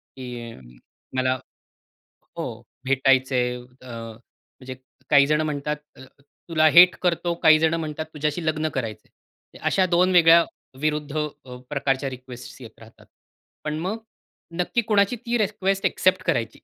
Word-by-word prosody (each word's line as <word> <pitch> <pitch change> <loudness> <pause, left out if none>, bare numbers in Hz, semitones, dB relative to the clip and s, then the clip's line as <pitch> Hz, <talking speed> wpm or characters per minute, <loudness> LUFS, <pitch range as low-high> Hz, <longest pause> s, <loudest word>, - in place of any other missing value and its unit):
की 120 -3 -8 0.6
मला 130 0 +2 1.0
हो - - -3 0.4
भेटायचंय. 130 -2 +2 0.2
अ, 130 - -12
म्हणजे 115 +3 -11 0.3
काही 140 -1 +6
जण 150 +1 +2
म्हणतात, 150 -1 -2 0.7
"तुला 155 -1 +4
हेट 180 +1 +9
करतो, 175 -1 0
काही 155 -1 +7
जण 160 0 +2
म्हणतात 155 -1 -3
तुझ्याशी 150 +2 -2
लग्न 155 0 0
करायचं 110 -5 -5
आहे." - - -23
अशा 190 - +3
2 180 +1 +2
वेगळ्या 170 -1 +7 0.4
विरुद्ध 150 -1 -1 0.3
अ, 125 -1 -9
प्रकारच्या 135 -1 -1
रिक्वेस्टस 130 0 -11
येत 115 -2 -13
राहतात. 110 0 -17 0.6
पण 155 0 -3
मग 190 +6 -3 0.6
नक्की 205 +7 +1
कोणाची 205 +1 +2
ती 240 0 0
रिक्वेस्ट 195 -2 -1
एक्सेप्ट 185 0 +2
करायची 115 -9 -1
150 Hz, 130 wpm, -23 LUFS, 130-170 Hz, 1.0 s, हेट